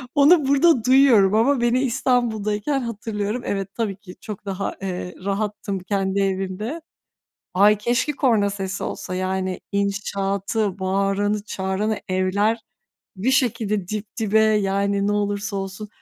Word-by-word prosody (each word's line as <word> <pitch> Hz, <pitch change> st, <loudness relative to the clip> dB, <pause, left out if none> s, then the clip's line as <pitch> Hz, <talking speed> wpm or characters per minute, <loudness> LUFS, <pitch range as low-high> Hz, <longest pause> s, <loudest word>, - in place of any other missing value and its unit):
Onu 290 Hz, +1 st, +5 dB
burada 280 Hz, -2 st, +4 dB
duyuyorum 250 Hz, -7 st, +5 dB
ama 255 Hz, +3 st, +3 dB
beni 240 Hz, +2 st, +2 dB
İstanbul'dayken 240 Hz, -1 st, 0 dB
hatırlıyorum. 220 Hz, 0 st, -3 dB
Evet, 195 Hz, -1 st, -3 dB
tabii 215 Hz, -5 st, -2 dB
ki 190 Hz, -2 st, -13 dB
çok 205 Hz, -2 st, -8 dB
daha, 195 Hz, 0 st, -3 dB
eee, 180 Hz, -1 st, -4 dB
rahattım 200 Hz, -1 st, -2 dB
kendi 195 Hz, +1 st, -1 dB
evimde. 195 Hz, -, -2 dB, 0.7 s
Ay, 205 Hz, +3 st, +5 dB
keşke 240 Hz, +7 st, 0 dB
korna 230 Hz, -8 st, +2 dB
sesi 195 Hz, -1 st, -4 dB
olsa 185 Hz, -, -5 dB
yani. 185 Hz, 0 st, -2 dB
İnşaatı, 200 Hz, 0 st, -1 dB
bağıranı 195 Hz, +2 st, 0 dB
çağıranı 200 Hz, +2 st, -2 dB
evler 190 Hz, +4 st, +1 dB, 0.6 s
bir 205 Hz, +8 st, 0 dB
şekilde 215 Hz, -7 st, 0 dB
dip 215 Hz, 0 st, -3 dB
dibe, 220 Hz, -2 st, +2 dB
yani, 200 Hz, -2 st, +1 dB
ne 205 Hz, -, +1 dB
olursa 205 Hz, 0 st, -1 dB
olsun. 195 Hz, +2 st, -5 dB
205 Hz, 125 wpm, -22 LUFS, 195-225 Hz, 0.7 s, Onu